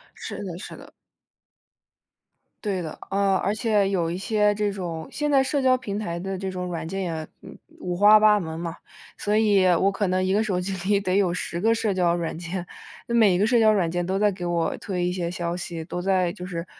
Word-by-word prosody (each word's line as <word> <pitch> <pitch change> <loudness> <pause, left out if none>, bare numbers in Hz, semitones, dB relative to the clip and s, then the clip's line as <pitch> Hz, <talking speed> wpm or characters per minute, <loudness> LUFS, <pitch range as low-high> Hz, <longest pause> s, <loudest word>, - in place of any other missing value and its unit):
是 - - -7
的 175 -3 -6
是 - - -9
的。 - - -14 1.7
对 195 -4 -1
的。 160 -2 -7
嗯， 195 -1 +2
而 200 +2 0
且 210 -3 +1
有 175 -4 0
一 175 - -3
些 210 +1 +2
这 210 0 0
种 175 -5 -5
现 295 0 -2
在 270 -1 +5
社 275 +1 -1
交 255 -1 +4
平 205 -5 -4
台 170 -5 -3
的 195 +1 -4
这 190 0 -4
种 180 -1 -4
软 165 -2 -4
件 195 +3 -3
也， 175 - -2 0.3
嗯， - - -11 0.2
五 180 -1 -3
花 210 +3 +7
八 210 -1 +6
门 160 -4 -5
嘛。 170 -1 -5 0.4
所 210 +1 0
以， 205 -3 +4
我 180 +2 +3
可 200 0 -1
能 185 +1 +1
1 190 - +1
个 210 +2 +3
手 185 -4 -1
机 195 +2 -3 0.2
里 205 -1 +3
得 185 -1 0
有 190 -4 +2
10 170 -1 -4
个 225 +2 +3
社 215 -3 0
交 175 -2 +2
软 170 -2 -3
件。 175 +1 -5 0.4
每 225 -5 +4
一 - - +1
个 205 - +3
社 240 +1 +3
交 220 -1 +5
软 185 -6 +1
件 175 +1 -1
都 190 +2 -1
在 210 0 +3
给 185 -2 -7
我 170 -1 0
推 180 -3 -3
一 180 - 0
些 175 -2 -2
消 175 -1 -3
息。 170 -2 -6
都 175 +2 -5
在 185 -2 +1
就 180 -2 -9
是 175 -1 -5
190 Hz, 245 characters per minute, -24 LUFS, 175-210 Hz, 1.7 s, 花